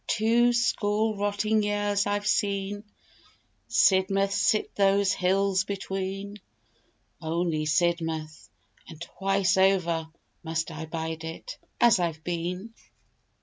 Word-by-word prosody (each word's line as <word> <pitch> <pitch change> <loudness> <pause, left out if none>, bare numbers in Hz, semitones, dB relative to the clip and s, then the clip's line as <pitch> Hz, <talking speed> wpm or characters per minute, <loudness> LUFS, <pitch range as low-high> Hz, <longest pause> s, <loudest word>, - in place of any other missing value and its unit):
Two 235 +2 +3
score 220 -2 +1
rotting 205 +2 0
years 205 -1 0
I've 205 0 -1
seen 205 -1 -1 0.8
Sidmouth 195 +1 +3
sit 215 +1 +1
those 200 -1 +3
hills 190 +1 +1
between: 195 +1 -5 0.8
Only 160 -1 -1
Sidmouth 160 -1 -1 0.4
and 160 -3 -11
twice 195 +2 0
over 180 -4 +2 0.4
Must 160 0 -3
I 160 0 -7
bide 160 0 -5
it, 165 - -8 0.2
as 240 -5 +5
I've 165 -3 -2
been. 180 +5 -4
195 Hz, 105 wpm, -27 LUFS, 170-205 Hz, 0.8 s, as